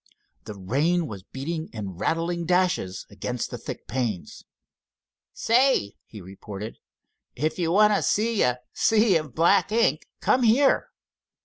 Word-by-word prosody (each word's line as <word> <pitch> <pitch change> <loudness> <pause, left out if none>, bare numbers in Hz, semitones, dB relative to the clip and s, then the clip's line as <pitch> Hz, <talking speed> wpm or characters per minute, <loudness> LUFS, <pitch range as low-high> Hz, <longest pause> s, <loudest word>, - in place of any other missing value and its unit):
The 105 -2 -7
rain 145 - 0
was 105 -9 -7
beating 155 - -5
in 105 -4 -5
rattling 165 - -2
dashes 180 - 0
against 115 +5 -4
the - - -6
thick - - -8
panes. 115 -7 -4 0.9
"Say," 240 - +2
he 105 - -11
reported, 100 +3 -9 0.6
"if 155 +4 -2
you 165 -2 0
want 210 +3 +5
to - - +1
see 220 +1 +1
a 125 0 +1
sea 220 -3 +3
of 155 -4 -7
black 175 +5 +3
ink, 230 +1 +1
come 255 - +2
here." 250 +4 +3
160 Hz, 135 wpm, -25 LUFS, -, 0.9 s, want